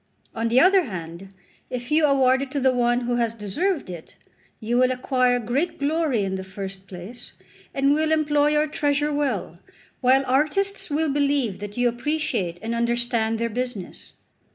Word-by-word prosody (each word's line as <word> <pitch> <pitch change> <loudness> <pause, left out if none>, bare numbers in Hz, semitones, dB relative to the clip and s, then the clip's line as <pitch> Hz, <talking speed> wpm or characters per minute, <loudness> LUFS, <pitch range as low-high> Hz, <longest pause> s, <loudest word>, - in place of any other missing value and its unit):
On 225 0 -1
the 235 +3 +4
other 370 +2 +5
hand, 175 -1 -8 0.4
if 245 +2 -5
you 305 0 +4
award 265 -1 +3
it 275 - -4
to 285 - 0
the 260 -1 +3
one 240 0 +2
who 240 0 -1
has 230 -1 0
deserved 295 - -2
it, 175 -3 -10 0.4
you 225 +2 -2
will 255 +1 +4
acquire 255 -1 +1
great 275 +9 -1
glory 290 -6 0
in 190 -1 -2
the 190 - -5
first 190 0 -6
place, 195 +7 -8 0.4
and 275 +1 +2
will 310 +1 +1
employ 295 -2 +3
your 300 0 +2
treasure 290 0 0
well, 290 -1 -2 0.4
while 260 +1 +4
artists 310 +10 +1
will 305 +1 0
believe 280 -7 0
that 205 +1 -8
you 245 0 +3
appreciate 240 - -2
and 225 +1 -2
understand 235 -1 0
their 230 +1 -1
business." 235 -5 -6
250 Hz, 170 wpm, -24 LUFS, 225-290 Hz, 0.4 s, other